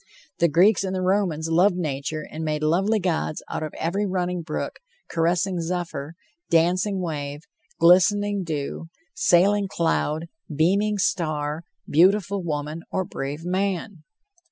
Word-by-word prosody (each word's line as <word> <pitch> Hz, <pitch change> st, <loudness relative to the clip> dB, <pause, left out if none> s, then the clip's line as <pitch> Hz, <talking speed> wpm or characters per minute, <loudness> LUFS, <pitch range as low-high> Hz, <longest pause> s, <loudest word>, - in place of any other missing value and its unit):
The 170 Hz, -, +5 dB
Greeks 180 Hz, +5 st, +4 dB
and 190 Hz, 0 st, -2 dB
the 185 Hz, -, -1 dB
Romans 180 Hz, -5 st, +1 dB
loved 175 Hz, +4 st, +4 dB
nature 155 Hz, -2 st, -3 dB
and 160 Hz, +1 st, -5 dB
made 155 Hz, -1 st, -2 dB
lovely 195 Hz, +8 st, +2 dB
gods 170 Hz, -4 st, -1 dB
out -, -, -3 dB
of. 155 Hz, -1 st, -4 dB
every 195 Hz, +6 st, -1 dB
running 180 Hz, -1 st, -1 dB
brook, 160 Hz, -, -4 dB, 0.3 s
caressing 175 Hz, +2 st, +1 dB
zephyr, 165 Hz, -3 st, -4 dB, 0.3 s
dancing 180 Hz, +4 st, +2 dB
wave, 145 Hz, -4 st, -4 dB, 0.4 s
glistening 200 Hz, +3 st, +4 dB
dew, 155 Hz, 0 st, -4 dB, 0.3 s
sailing 200 Hz, +3 st, +3 dB
cloud, 165 Hz, -3 st, 0 dB, 0.3 s
beaming 195 Hz, +8 st, +2 dB
star, 155 Hz, -4 st, -1 dB, 0.2 s
beautiful 195 Hz, +4 st, +3 dB
woman, 155 Hz, -1 st, -3 dB
or 185 Hz, -, -1 dB
brave 145 Hz, +1 st, -5 dB
man. 190 Hz, 0 st, -2 dB
175 Hz, 130 wpm, -24 LUFS, 155-190 Hz, 0.4 s, The